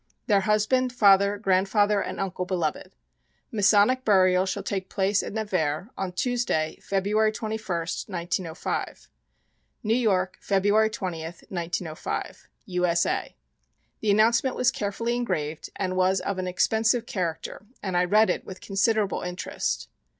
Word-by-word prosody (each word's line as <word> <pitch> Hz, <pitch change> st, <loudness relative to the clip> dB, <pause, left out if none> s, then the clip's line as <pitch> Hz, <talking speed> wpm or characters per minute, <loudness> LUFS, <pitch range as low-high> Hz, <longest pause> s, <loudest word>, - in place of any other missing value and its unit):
Their 200 Hz, -3 st, +3 dB
husband, 215 Hz, +5 st, +2 dB
father, 200 Hz, -3 st, +4 dB
grandfather 200 Hz, +1 st, +2 dB
and -, -, -5 dB
uncle 185 Hz, -1 st, -2 dB
beloved. 175 Hz, -5 st, -3 dB, 0.6 s
Masonic 210 Hz, +5 st, +4 dB
burial 185 Hz, -3 st, +4 dB
shall 195 Hz, +1 st, -3 dB
take 190 Hz, -1 st, -3 dB
place 200 Hz, +1 st, +1 dB
at -, -, -6 dB
Nevers 185 Hz, -5 st, -1 dB
on 185 Hz, -2 st, -4 dB
Tuesday, 180 Hz, -7 st, -1 dB
February 210 Hz, +3 st, +1 dB
21, 220 Hz, 0 st, -4 dB, 0.5 s
1905. 175 Hz, -2 st, -3 dB, 0.8 s
New 220 Hz, 0 st, +1 dB
York, 190 Hz, -6 st, +1 dB
February 205 Hz, +2 st, +3 dB
20, 185 Hz, -7 st, -4 dB
1905. 170 Hz, 0 st, -5 dB, 0.2 s
U. 180 Hz, -3 st, 0 dB
S. 170 Hz, 0 st, +2 dB
A. -, -, -2 dB, 0.6 s
The 215 Hz, -, -1 dB
announcement 230 Hz, +5 st, +3 dB
was 250 Hz, +1 st, +3 dB
carefully 230 Hz, +4 st, -2 dB
engraved 155 Hz, -11 st, -3 dB
and 185 Hz, -2 st, -2 dB
was 185 Hz, +1 st, +2 dB
of 195 Hz, -2 st, -3 dB
an 185 Hz, -, -2 dB
expensive 220 Hz, +6 st, +2 dB
character, 180 Hz, +1 st, -4 dB, 0.2 s
and 190 Hz, -3 st, -2 dB
I 175 Hz, -, +4 dB
read 215 Hz, +4 st, +4 dB
it -, -, -3 dB
with 185 Hz, -, -9 dB
considerable 205 Hz, +1 st, 0 dB
interest. 180 Hz, 0 st, -3 dB
195 Hz, 135 wpm, -26 LUFS, 185-215 Hz, 0.8 s, father